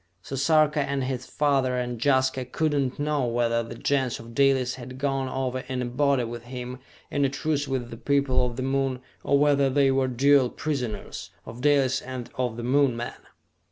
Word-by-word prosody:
So 135 Hz, -, -5 dB
Sarka 150 Hz, +2 st, +3 dB
and 140 Hz, -1 st, -1 dB
his 130 Hz, -1 st, -3 dB
father 135 Hz, -4 st, +1 dB
and 120 Hz, -2 st, -3 dB
Jaska 130 Hz, -2 st, +2 dB
could 155 Hz, +4 st, -1 dB
not 135 Hz, -3 st, 0 dB
know 145 Hz, -3 st, 0 dB
whether 115 Hz, 0 st, +1 dB
the 115 Hz, 0 st, -7 dB
Gens 130 Hz, -1 st, 0 dB
of 115 Hz, 0 st, -11 dB
Dalis 135 Hz, -1 st, +3 dB
had 130 Hz, 0 st, -9 dB
gone 135 Hz, -1 st, -1 dB
over 130 Hz, -1 st, -2 dB
in 130 Hz, -1 st, -2 dB
a -, -, -2 dB
body 135 Hz, +1 st, +1 dB
with 120 Hz, 0 st, -6 dB
him, 125 Hz, 0 st, -6 dB, 0.3 s
in 145 Hz, -, +1 dB
a 135 Hz, -, +3 dB
truce 145 Hz, +1 st, -1 dB
with 130 Hz, -3 st, -3 dB
the 115 Hz, -, -7 dB
people 140 Hz, +1 st, +1 dB
of 120 Hz, -1 st, -2 dB
the 130 Hz, -, -3 dB
Moon, 135 Hz, -1 st, 0 dB, 0.2 s
or 140 Hz, -, +3 dB
whether 140 Hz, -1 st, +3 dB
they 135 Hz, 0 st, +3 dB
were 135 Hz, 0 st, +2 dB
dual 130 Hz, +1 st, +4 dB
prisoners 125 Hz, -8 st, -4 dB, 0.2 s
of 115 Hz, +2 st, -9 dB
Dalis 135 Hz, -2 st, +3 dB
and 130 Hz, -2 st, -7 dB
of 125 Hz, -3 st, -2 dB
the 120 Hz, -, -5 dB
Moon 130 Hz, 0 st, +2 dB
men! 120 Hz, -, -4 dB
130 Hz, 195 wpm, -26 LUFS, 125-140 Hz, 0.3 s, dual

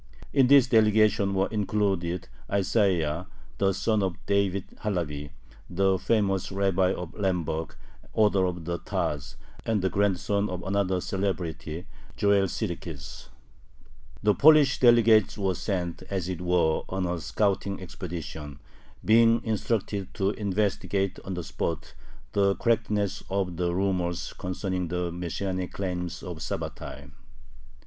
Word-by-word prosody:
In 135 Hz, -3 st, +5 dB
this 140 Hz, -1 st, +7 dB
delegation 110 Hz, -4 st, +3 dB
were 95 Hz, +1 st, +2 dB
included 100 Hz, -5 st, -1 dB, 0.2 s
Isaiah, 90 Hz, -5 st, +1 dB, 0.3 s
the 95 Hz, 0 st, +3 dB
son 105 Hz, +2 st, +1 dB
of 95 Hz, -2 st, -1 dB
David 100 Hz, -1 st, +1 dB
Halevi, 75 Hz, -8 st, -3 dB, 0.4 s
the 95 Hz, +1 st, +2 dB
famous 100 Hz, -5 st, +1 dB
rabbi 95 Hz, -1 st, +2 dB
of 90 Hz, -3 st, -5 dB
Lemberg, 85 Hz, -5 st, -2 dB, 0.4 s
author 100 Hz, -3 st, +3 dB
of 90 Hz, -2 st, -5 dB
the 85 Hz, 0 st, -2 dB
Taz, 70 Hz, -4 st, -3 dB, 0.3 s
and 110 Hz, -4 st, 0 dB
the 95 Hz, -, +1 dB
grandson 100 Hz, +1 st, +1 dB
of 90 Hz, -1 st, -5 dB
another 95 Hz, -2 st, 0 dB
celebrity, 90 Hz, -4 st, -3 dB, 0.3 s
Joel 100 Hz, -1 st, +3 dB
Sirkis. -, -, -5 dB, 0.9 s
The 105 Hz, 0 st, +5 dB
Polish 150 Hz, +1 st, +6 dB
delegates 115 Hz, -4 st, +5 dB
were 95 Hz, -2 st, +1 dB
sent, 90 Hz, -2 st, -3 dB
as 95 Hz, -3 st, -2 dB
it 90 Hz, -2 st, -4 dB
were, 90 Hz, -3 st, +2 dB
on 95 Hz, 0 st, -1 dB
a 85 Hz, -1 st, -2 dB
scouting 100 Hz, +1 st, 0 dB
expedition, 80 Hz, -5 st, -7 dB, 0.5 s
being 115 Hz, +1 st, +5 dB
instructed 105 Hz, -3 st, -2 dB
to 95 Hz, +1 st, +1 dB
investigate 100 Hz, -1 st, -1 dB
on 95 Hz, -, -4 dB
the 90 Hz, -, -4 dB
spot 80 Hz, -1 st, -4 dB, 0.4 s
the 100 Hz, -1 st, +2 dB
correctness 105 Hz, -4 st, 0 dB
of 95 Hz, -2 st, -1 dB
the 90 Hz, 0 st, 0 dB
rumors 90 Hz, -3 st, -1 dB
concerning 90 Hz, -1 st, -3 dB
the 90 Hz, 0 st, -2 dB
Messianic 90 Hz, +2 st, -3 dB
claims 90 Hz, -3 st, -4 dB
of -, -, -6 dB
Sabbatai. -, -, -6 dB
95 Hz, 125 wpm, -27 LUFS, 90-105 Hz, 0.9 s, this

